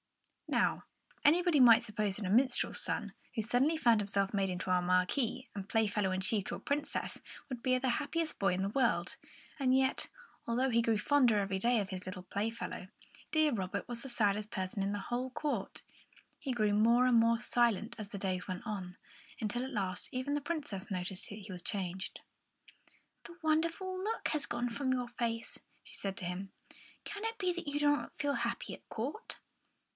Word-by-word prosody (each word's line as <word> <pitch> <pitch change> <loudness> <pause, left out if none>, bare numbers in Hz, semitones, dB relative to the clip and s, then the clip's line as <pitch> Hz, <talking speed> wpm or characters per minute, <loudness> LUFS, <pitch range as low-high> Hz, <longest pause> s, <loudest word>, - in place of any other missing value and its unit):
Now, - - +1 0.4
anybody 335 +1 +5
might 235 -1 +8
suppose 210 -3 -1
that 210 - -4
a - - -1
minstrel's 250 +4 +3
son, - - -2 0.2
who 225 - +1
suddenly 260 +9 +2
found 235 -7 +4
himself 200 0 0
made 195 -1 +1
into 180 0 -2
a 180 0 +4
Marquis 185 +9 +1
and 200 0 -6
Playfellow 210 -3 +2
in 185 - 0
chief 205 0 +1
to - - -3
a - - -7
Princess, 290 +1 -2 0.3
would 255 -4 -5
be 255 -1 +3
the 255 0 +1
happiest 315 +2 -2
boy 195 -2 +3
in 190 - -1
the 195 - 0
world. 235 +2 +1 0.4
And 260 -1 +4
yet, 265 0 +1 0.4
although 250 +3 +1
he 235 0 +4
grew 230 -1 +2
fonder 245 -1 +4
every 195 -1 -1
day 240 +3 +3
of 200 -2 -2
his 185 -1 -5
little 185 0 -6
playfellow, 220 +5 -3 0.4
deaf 310 -6 +3
Robert 195 +1 -3
was 240 -1 -5
the 270 - -6
saddest 210 -3 +1
person 190 -2 -2
in 200 - 0
the 205 - -1
whole 245 +5 -2
court. 290 +3 -3 0.6
He 270 - -3
grew 215 -4 +2
more 235 +4 +5
and 250 -1 +4
more 230 0 +4
silent 235 -4 +2
as 210 -2 -5
the 200 - -5
days 185 -2 -2
went 185 -1 -5
on, 185 -4 -5 0.4
until 240 +2 -1
at 265 - -5
last 190 -6 -2
even 255 +3 -2
the 290 - 0
Princess 290 - -4
noticed 185 0 -1
that 205 - -6
he 205 -1 -9
was 180 -1 -6
changed. 190 -1 -3 1.0
"The 340 +1 -11
wonderful 335 +4 0
look 445 +2 -1
has 300 -2 0
gone 240 +1 -1
from 260 +3 -1
your 250 -1 0
face," 230 -1 -3 0.2
she - - -9
said 195 -1 -4
to 180 - -2
him. 185 +2 -4 0.5
"Can 410 +1 -6
it 450 0 -2
be 365 -4 +1
that 345 -2 -6
you 285 0 -1
do 295 - +3
not - - -6
feel 290 0 0
happy - - -2
at - - -13
court?" 280 - -4
230 Hz, 195 wpm, -33 LUFS, 195-270 Hz, 1.0 s, might